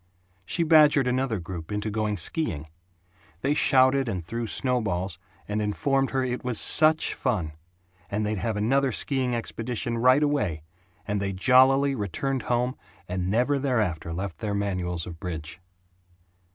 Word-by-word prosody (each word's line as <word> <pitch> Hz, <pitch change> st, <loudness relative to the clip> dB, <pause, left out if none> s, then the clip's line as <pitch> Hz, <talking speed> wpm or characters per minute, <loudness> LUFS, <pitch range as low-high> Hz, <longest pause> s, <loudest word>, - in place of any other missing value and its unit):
She 170 Hz, -, 0 dB
badgered 150 Hz, -4 st, +5 dB
another 125 Hz, -2 st, 0 dB
group 85 Hz, -1 st, -7 dB
into 105 Hz, +1 st, -2 dB
going 105 Hz, -1 st, -1 dB
skiing. 85 Hz, -, -1 dB, 0.8 s
They 140 Hz, +5 st, +1 dB
shouted 130 Hz, -2 st, +3 dB
and 90 Hz, -6 st, -4 dB
threw 115 Hz, +5 st, -4 dB
snowballs, 100 Hz, -, -1 dB, 0.3 s
and 105 Hz, +1 st, -2 dB
informed 135 Hz, +6 st, 0 dB
her 130 Hz, -1 st, 0 dB
that 125 Hz, -, -2 dB
it 125 Hz, -, -5 dB
was 125 Hz, -3 st, 0 dB
SUCH 155 Hz, 0 st, +4 dB
fun, 105 Hz, -, -2 dB, 0.6 s
and 105 Hz, +1 st, -1 dB
they'd 105 Hz, -1 st, -2 dB
have 110 Hz, -1 st, -2 dB
another 135 Hz, +5 st, +2 dB
skiing 130 Hz, -3 st, -1 dB
expedition 115 Hz, +1 st, -3 dB
right 130 Hz, +4 st, +5 dB
away, 105 Hz, -, -1 dB, 0.4 s
and 105 Hz, -1 st, -1 dB
they 100 Hz, -1 st, -2 dB
jollily 130 Hz, +6 st, +4 dB
returned 130 Hz, +4 st, -2 dB
home 125 Hz, +2 st, 0 dB, 0.3 s
and 90 Hz, 0 st, -2 dB
never 125 Hz, +7 st, +1 dB
thereafter 105 Hz, -, -1 dB
left 85 Hz, -1 st, -5 dB
their 105 Hz, -2 st, -2 dB
manuals 90 Hz, -4 st, -2 dB
of 85 Hz, -2 st, -9 dB
bridge. 80 Hz, -2 st, -6 dB
115 Hz, 150 wpm, -26 LUFS, 95-130 Hz, 0.8 s, badgered